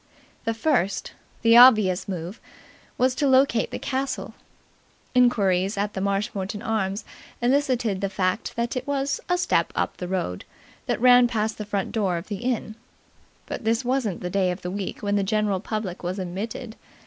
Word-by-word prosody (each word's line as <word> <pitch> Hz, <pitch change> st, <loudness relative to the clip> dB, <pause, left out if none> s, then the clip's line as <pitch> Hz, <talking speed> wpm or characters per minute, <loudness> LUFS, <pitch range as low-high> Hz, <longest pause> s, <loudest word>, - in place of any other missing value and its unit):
The 225 Hz, 0 st, 0 dB
first, 225 Hz, -, 0 dB, 0.3 s
the 230 Hz, 0 st, +6 dB
obvious 215 Hz, -7 st, +6 dB
move 180 Hz, +2 st, -5 dB, 0.6 s
was 255 Hz, 0 st, +3 dB
to 285 Hz, +2 st, 0 dB
locate 260 Hz, -3 st, +3 dB
the -, -, -5 dB
castle. 265 Hz, 0 st, -3 dB, 0.8 s
Inquiries 200 Hz, -6 st, +3 dB
at 205 Hz, +1 st, -1 dB
the 190 Hz, -, -3 dB
Marshmoreton 200 Hz, 0 st, -2 dB
Arms 200 Hz, -2 st, -1 dB, 0.3 s
elicited 245 Hz, -6 st, +1 dB
the 195 Hz, -, 0 dB
fact 185 Hz, -2 st, -1 dB
that 235 Hz, +2 st, -2 dB
it 255 Hz, -, -4 dB
was 280 Hz, 0 st, -1 dB
"a 355 Hz, -, +3 dB
step" 360 Hz, -, +1 dB
up -, -, -1 dB
the 180 Hz, -, -5 dB
road 175 Hz, -, -3 dB, 0.4 s
that -, -, 0 dB
ran 245 Hz, 0 st, +7 dB
past 220 Hz, -2 st, -2 dB
the 210 Hz, -, -4 dB
front 200 Hz, -2 st, -2 dB
door 195 Hz, -6 st, 0 dB
of 170 Hz, +5 st, -8 dB
the 205 Hz, -, -3 dB
inn. 240 Hz, -1 st, -2 dB, 0.7 s
But -, -, -6 dB
this 225 Hz, +3 st, +1 dB
wasn't 245 Hz, -7 st, -1 dB
the 180 Hz, -, -4 dB
day 190 Hz, -1 st, +2 dB
of 180 Hz, +1 st, -4 dB
the 180 Hz, -, -3 dB
week 195 Hz, +1 st, -5 dB
when 205 Hz, 0 st, +1 dB
the 200 Hz, -, +1 dB
general 210 Hz, -1 st, 0 dB
public 210 Hz, -3 st, -4 dB
was 180 Hz, +2 st, -3 dB
admitted. 210 Hz, +5 st, -5 dB
210 Hz, 170 wpm, -24 LUFS, 190-245 Hz, 0.8 s, ran